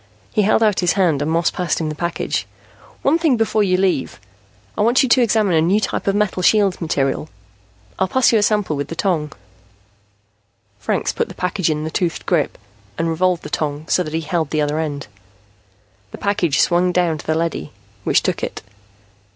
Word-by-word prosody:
He 215 - +3
held 215 +2 +3
out 210 -3 +2
his 180 -2 +2
hand 175 -8 +2
and 145 - -1
Moss 165 +1 +1
passed 180 -3 -1
him 160 -2 -2
the - - -3
package. 170 +2 -2 0.6
"One 310 +5 +3
thing 310 -7 +2
before 225 -1 +1
you 185 -3 +2
leave. 185 - 0 0.6
I - - -1
want 240 +6 +4
you 260 - 0
to 255 - +5
examine 215 -4 +2
a 160 - +4
new 185 +6 +3
type 215 - -3
of 195 - +2
metal 205 -3 0
shield 200 -1 +3
material. 150 -2 -1 0.7
I'll 190 - +2
pass 260 +6 +3
you 225 - +5
a - - +1
sample 205 -6 +1
with 140 -1 -3
the 165 - -6
tong." 160 -6 -1 1.5
Franks - - -1
put - - -1
the - - -10
package 180 -1 -1
in 155 -1 -1
the 160 - -4
toothed 170 -1 -2
grip 170 -6 0 0.4
and 165 0 0
revolved 180 +1 +1
the - - -7
tong 150 0 -2
so - - +2
that 155 -2 -4
he 165 - 0
held 160 -1 -2
the 155 0 0
other 150 +1 0
end. 145 -3 -3 1.0
The - - -9
package 185 -7 +1
swung 175 +1 +2
down 175 -3 +1
to - - -11
the 155 - +1
leady, 165 - -2 0.3
which - - +2
took - - -1
it. - - -5
175 Hz, 200 wpm, -19 LUFS, 155-200 Hz, 1.5 s, to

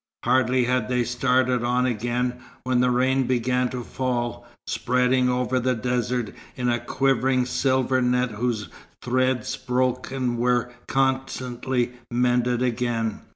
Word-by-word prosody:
Hardly 125 +1 +3
had 125 -2 0
they 125 -1 +1
started 125 0 +1
on 125 +1 +1
again, 125 +1 -1 0.2
when 125 -1 +2
rain 125 +1 +2
began 125 0 +1
to 125 -1 -5
fall, 120 -1 -3 0.2
spreading 125 +1 +1
over 125 +1 0
the 125 +1 +1
desert 125 -1 -1 0.2
in 125 -1 -1
a 120 0 +1
quivering 130 -1 +1
silver 130 0 +1
net 125 0 +1
whose 110 -1 -2 0.3
threads 130 +1 0
broke 125 0 -1
and 125 -3 -2
were 125 0 +1 0.2
constantly 130 -2 -1 0.2
mended 125 0 +1
again. 120 -2 -1
125 Hz, 125 wpm, -24 LUFS, 120-130 Hz, 0.3 s, Hardly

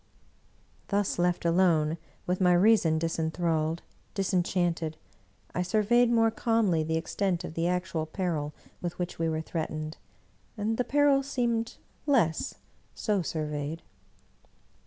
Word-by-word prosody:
Thus 200 -3 0
left 175 0 +1
alone, 165 -2 +3 0.3
with 180 +1 -1
my 180 -1 +5
reason 175 -4 +4
disinthralled, 165 0 0 0.3
disen 190 -2 +1
chanted, 170 -3 -1 0.6
I 180 - 0
surveyed 220 +6 +3
more 225 -1 +4
calmly 225 -8 +2
the 160 +1 0
extent 180 +2 -1
of 165 - -6
the 165 +1 0
actual 175 -3 -1
peril 160 -4 -2 0.3
with 175 0 -4
which 180 -2 -4
we 165 0 +1
were 160 0 -1
threatened, 155 -1 -4 0.6
and 215 +2 -1
the 250 - +2
peril 285 0 +4
seemed 235 -4 -1 0.3
less, 175 - +2 0.4
so 210 -3 0
surveyed. 155 0 -3
175 Hz, 125 wpm, -29 LUFS, 160-210 Hz, 0.6 s, my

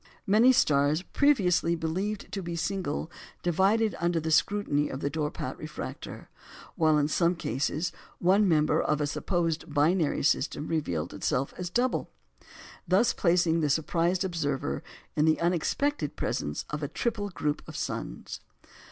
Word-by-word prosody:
Many 220 +6 +6
stars 150 - +3
previously 185 - +2
believed 185 +6 -3
to 195 - -3
be 170 -1 -4
single 170 -2 -2 0.3
divided 195 +6 +2
under 170 -1 +1
the 160 0 -3
scrutiny 160 -4 +2
of 130 - -5
the 140 - -2
Dorpat 150 0 -3
refractor; - - -7 0.5
while 155 -2 +3
in 145 -1 +2
some 170 +3 +2
cases, 145 +3 -2 0.3
one 195 +4 +4
member 155 -2 +3
of 150 - 0
a 150 - +1
supposed 165 +1 -1
binary 155 +2 +2
system 145 +1 +1
revealed 90 - -2
itself 135 +2 -1
as 180 -1 -4
double, 245 +6 0 0.8
thus 195 +7 +3
placing 170 -2 +2
the 150 -2 +1
surprised 170 +4 +1
observer 145 -6 -2 0.3
in 150 -1 +3
the 160 0 +3
unexpected 180 - 0
presence - - -2
of - - -3
a - - -1
triple 220 -4 -2
group 150 -5 -2
of - - -9
suns. - - -5
170 Hz, 145 wpm, -28 LUFS, 150-190 Hz, 0.8 s, Many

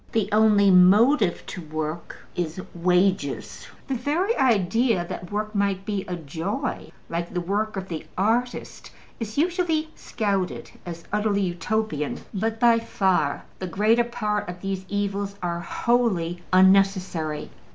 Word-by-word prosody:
The 215 -3 +1
only 210 -2 +5
motive 200 +3 +5
to 180 - -7
work 155 +1 -5 0.2
is 170 0 -3
wages: 180 -3 0 0.2
the 270 - -1
very 305 - 0
idea 225 - +2
that 180 +1 -7
work 210 +1 -2
might 200 -2 0
be 200 -3 -2
a 180 - -3
joy, 170 - -4 0.2
like 170 +1 -3
the 180 - -1
work 205 +4 -1
of 190 0 -4
the 165 -4 -6
artist, 230 +6 -1 0.3
is 220 0 -5
usually 325 -1 +1
scouted 200 -5 -2 0.2
as 170 -1 -7
utterly 210 -1 +1
Utopian. 175 -2 -2
But 220 +3 -2
by 235 -1 +5
far 190 -10 0 0.2
the 185 - -4
greater 215 +6 +3
part 210 -4 -2
of 180 0 -8
these 195 -1 -4
evils 200 0 -2
are 170 -1 -1
wholly 180 -5 0
unnecessary. 185 -5 +3
200 Hz, 135 wpm, -24 LUFS, 175-220 Hz, 0.3 s, only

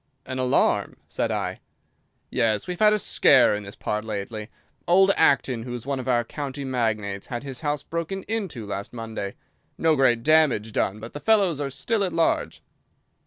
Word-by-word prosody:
"An 130 0 -5
alarm!" 130 0 +1
said - - -2
I. - - -2 0.7
"Yes, 110 -2 +1
we've 180 -1 -5
had 215 -1 +6
a 215 - +3
scare 210 - +4
in 105 - -2
this 100 0 -10
part 105 0 -3
lately. 105 0 -5 0.4
Old 190 +3 +5
Acton, 130 -6 +3
who 120 +1 -5
is 120 - -7
one 140 -1 -2
of 130 - -6
our 120 -2 +2
county 140 +2 -5
magnates, 110 -6 -2
had 120 -1 -5
his 135 -1 -7
house 145 -2 -1
broken 170 +3 -4
into 195 - -4
last 100 +1 -5
Monday. 110 -4 -5 0.4
No 160 -1 +3
great 120 -4 +3
damage 150 -8 +3
done, 105 0 -1
but 115 +2 -9
the 145 - -6
fellows 195 -7 +2
are 140 - -2
still 215 - -1
at 180 -3 -2
large." 165 0 0
130 Hz, 180 wpm, -25 LUFS, 110-160 Hz, 0.7 s, had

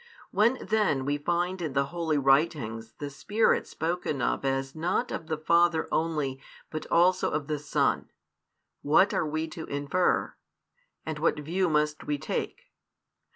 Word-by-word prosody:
When 235 +5 +3
then 210 -12 +1
we 145 +1 0
find 175 +4 -1
in 155 -5 -3
the 140 +1 +2
Holy 165 -3 0
Writings 135 -5 +1
the 145 -1 -6
Spirit 210 +10 +1
spoken 165 -3 -2
of 125 - 0
as 135 0 -1
not 175 +9 -1
of 160 - -5
the 160 -1 -2
Father 170 +1 +3
only 150 -5 -1 0.3
but 155 - -5
also 180 +2 +3
of 150 -1 -2
the 150 0 -2
Son, 150 +1 0 0.7
what 170 +7 +4
are 155 - 0
we 155 +1 -2
to 160 +1 -7
infer, 145 +6 0 0.7
and 155 -1 -4
what 155 -1 +1
view 175 +5 0
must 150 0 0
we 145 - -1
take? - - -4
155 Hz, 155 wpm, -28 LUFS, 145-175 Hz, 0.7 s, what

